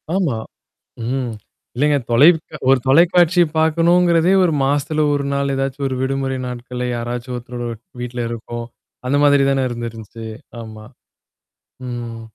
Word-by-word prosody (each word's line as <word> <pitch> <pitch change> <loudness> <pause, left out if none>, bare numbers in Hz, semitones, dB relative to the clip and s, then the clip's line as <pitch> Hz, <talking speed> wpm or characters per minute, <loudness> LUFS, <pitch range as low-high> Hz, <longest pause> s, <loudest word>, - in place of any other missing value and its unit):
ஆமா, 160 -12 0 0.7
ம். 125 -1 -2 0.4
இல்லேங்க 145 +3 +2
தொலைக் 155 +8 +6 0.3
ஒரு 135 -1 +5
தொலைக்காட்சிய 175 +3 +5
பாக்கணுங்கிறதே, 170 +2 +3
ஒரு 165 - +1
மாசத்துல 145 +2 +1
ஒரு 140 -1 -1
நாள் 140 0 0
ஏதாச்சும் 135 +1 -2
ஒரு 130 - -2
விடுமுறை 135 0 -1
நாட்கள்ல 125 0 -5
யாராச்சும் 120 +1 -4
ஒருத்தரோட 120 0 -6 0.3
வீட்ல 120 -1 -4
இருக்கும். 120 0 -6 0.4
அந்த 140 +2 +2
மாதிரி 145 -1 +5
தானே 135 -1 +1
இருந்து 120 -1 -4
இருந்துச்சு. 115 0 -10 0.4
ஆமா. 110 -1 -10 1.0
ம். 120 -2 -6
135 Hz, 125 wpm, -19 LUFS, 120-150 Hz, 1.0 s, தொலைக்